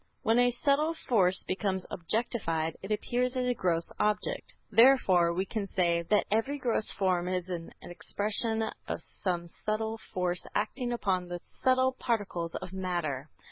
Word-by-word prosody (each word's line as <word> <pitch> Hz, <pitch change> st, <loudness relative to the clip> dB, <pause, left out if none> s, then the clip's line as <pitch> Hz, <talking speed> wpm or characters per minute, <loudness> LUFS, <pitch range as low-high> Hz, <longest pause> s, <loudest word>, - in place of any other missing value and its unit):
When 225 Hz, +2 st, +4 dB
a 245 Hz, 0 st, +5 dB
subtle 285 Hz, +6 st, +1 dB
force 190 Hz, -, +2 dB
becomes 190 Hz, -1 st, -1 dB
objectified, 165 Hz, -4 st, -1 dB
it 195 Hz, -, -7 dB
appears 245 Hz, +4 st, 0 dB
as 250 Hz, -, +1 dB
a 250 Hz, -, +3 dB
gross 170 Hz, -6 st, 0 dB
object. 210 Hz, 0 st, 0 dB, 0.2 s
Therefore, 210 Hz, -9 st, +6 dB
we 185 Hz, +3 st, -1 dB
can 200 Hz, +1 st, -3 dB
say, 170 Hz, -3 st, +2 dB
that 205 Hz, +5 st, +2 dB
every 225 Hz, +7 st, +1 dB
gross 240 Hz, -5 st, +1 dB
form 185 Hz, -2 st, +1 dB
is 185 Hz, 0 st, -2 dB
an 170 Hz, -2 st, -5 dB
expression 220 Hz, +5 st, -1 dB, 0.2 s
of -, -, -2 dB
some 175 Hz, -3 st, -3 dB
subtle 220 Hz, +5 st, -3 dB
force 180 Hz, -1 st, -1 dB
acting 245 Hz, +4 st, -1 dB
upon 190 Hz, -6 st, 0 dB
the 175 Hz, 0 st, -5 dB, 0.2 s
subtle 260 Hz, 0 st, +4 dB
particles 205 Hz, -9 st, -2 dB
of 180 Hz, -, -6 dB
matter. 170 Hz, -7 st, -2 dB
200 Hz, 150 wpm, -30 LUFS, 175-235 Hz, 0.2 s, Therefore